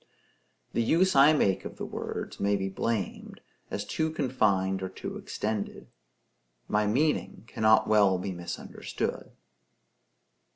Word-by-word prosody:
The - - +1
use 170 +10 +3
I 140 +3 +8
make 100 -11 +2
of - - -7
the - - -4
words - - -5
may 100 +1 +2
be 95 -1 -2
blamed, 110 +1 -3 0.3
as 100 - -3
too 160 +7 -1
confined 100 -10 +1
or 95 - -3
too 95 - -7
extended; 105 -1 -4 0.8
my 105 0 +1
meaning 140 -1 0
cannot 110 -1 +3
well 100 -3 +4
be 95 +2 -4
misunderstood. 90 -1 -5
105 Hz, 125 wpm, -28 LUFS, 95-130 Hz, 0.8 s, I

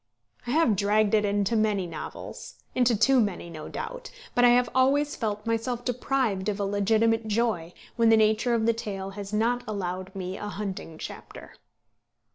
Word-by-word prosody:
I - - -3
have 275 -5 +3
dragged 205 +2 +2
it 210 -1 +4
into 205 +2 +1
many 210 -3 +1
novels, 165 -3 -8 0.2
into 245 -3 +3
too 260 +5 +4
many 195 -6 -1
no 155 -2 -8
doubt, - - -6 0.2
but 245 - +3
I 245 - +8
have 245 0 +4
always 280 +3 +2
felt 210 -2 -3
myself 230 +2 -2
deprived 245 -5 0
of 205 0 -3
a 200 - 0
legitimate 220 +3 +2
joy 210 -6 0 0.3
when 230 -1 +4
the 225 - +6
nature 220 +3 +3
of 220 -1 +1
the 230 - +4
tale 195 -4 -5
has 200 0 -7
not 235 +3 +1
allowed 185 -2 -4
me 185 0 -4
a 210 - -5
hunting 195 -6 -5
chapter. - - -9
215 Hz, 175 wpm, -27 LUFS, 200-235 Hz, 0.3 s, I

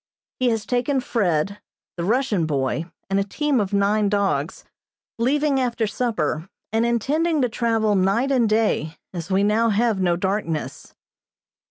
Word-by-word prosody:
He 255 -1 +3
has 225 -2 -1
taken 250 +3 0
Fred, 200 -5 0 0.4
the 170 - -4
Russian 215 -5 +1
boy, 140 +2 -1 0.2
and 195 +1 +1
a - - +2
team 285 +6 0
of 200 -2 -1
nine 200 +1 +2
dogs, 200 -1 -1 0.6
leaving 280 +3 +2
after 240 -3 0
supper, 195 -8 -2 0.2
and 225 +1 +2
intending 300 +8 +1
to 250 - +1
travel 225 -2 +1
night 200 +8 +2
and 240 -5 +3
day, 215 -7 +1 0.2
as 170 -2 -6
we 195 +1 +2
now 220 +3 +3
have 220 -1 +1
no 175 -2 +2
darkness. 180 -4 -3
215 Hz, 150 wpm, -22 LUFS, 190-245 Hz, 0.6 s, He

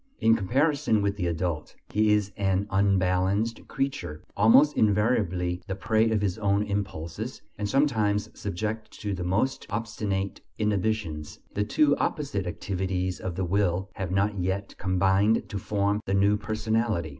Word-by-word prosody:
In 115 -1 +5
comparison 130 - +1
with 100 0 0
the 90 -4 -2
adult, 85 -2 -2 0.2
he 105 +1 +3
is 105 -1 +2
an 95 0 +1
unbalanced 95 +2 +1
creature, 135 - -3
almost 135 +8 +6
invariably 100 -5 +1
the 95 - -2
prey 110 +3 +2
of 110 -2 +1
his 100 +1 -1
own 100 -1 +2
impulses 100 +1 -4 0.2
and 105 -1 -1
sometimes 110 -7 +2
subject 110 +3 -4
to 105 -2 -2
the 95 -1 -4
most 95 +9 0
obstinate 105 -3 -3 0.2
inhibitions. 105 -7 -1 0.2
The 105 - 0
two 145 +6 +3
opposite 105 -11 -2
activities 95 0 -2
of 90 -3 -4
the 95 0 -1
will 95 0 0
have 95 -2 -4
not 100 +2 +1
yet 95 +2 -2
combined 95 +3 +2
to 100 - -3
form 100 +1 0
the 95 - +1
new 100 +1 +4
personality. 110 -3 -1
100 Hz, 145 wpm, -27 LUFS, 95-110 Hz, 0.2 s, almost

